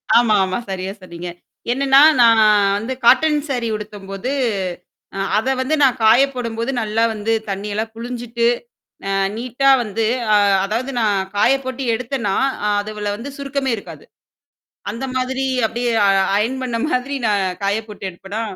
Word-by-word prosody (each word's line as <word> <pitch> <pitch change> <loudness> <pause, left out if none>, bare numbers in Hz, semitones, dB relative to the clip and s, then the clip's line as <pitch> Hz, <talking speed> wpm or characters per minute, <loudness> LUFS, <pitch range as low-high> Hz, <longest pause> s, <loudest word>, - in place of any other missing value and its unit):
ஆமா, 235 -3 +5
ஆமா. 185 0 -2
சரியா 190 0 -4
சொன்னீங்க. 175 -1 -8 0.4
என்னன்னா, 270 +2 +4 0.2
நான் 230 -1 +6 0.4
வந்து 230 +5 -4
காட்டன் 300 +4 +5
சாரி 245 -3 -1
உடுத்தும்போது 205 +2 -6 0.9
அ - - -3 0.2
அத 255 +5 0
வந்து 265 +4 +1
நான் 260 -3 +3
காயப்போடும்போது, 240 0 +2
நல்லா 220 +1 0
வந்து 220 +1 -1 0.2
தண்ணியெல்லாம் 210 +3 -3
புளிஞ்சுட்டு, 235 0 -2 0.6
அ - - -1 0.3
நீட்டா 255 +3 0
வந்து 220 0 -2 0.3
அ - - +6 0.3
அதாவது 235 +6 -2
நான் 210 -3 +2 0.2
காய 205 - +4
போட்டு 260 +1 -4
எடுத்தன்னா, 230 -4 -2 0.4
அதுவுல 210 0 -4
வந்து 240 +6 -7
சுருக்கமே 275 -2 -2
இருக்காது. - - -11 0.9
அந்த 245 +4 -5
மாதிரி 260 +1 -1 0.2
அப்டியே 240 +1 -2 0.2
அ - - +4 0.3
அயர்ன் 230 +6 0
பண்ண 240 -2 -2
மாதிரி 275 0 -1
நான் 205 -2 +2 0.2
காய 200 +2 +1
போட்டு 205 -2 -6
எடுப்பனா! 195 +5 -6
230 Hz, 140 wpm, -19 LUFS, 210-260 Hz, 0.9 s, நான்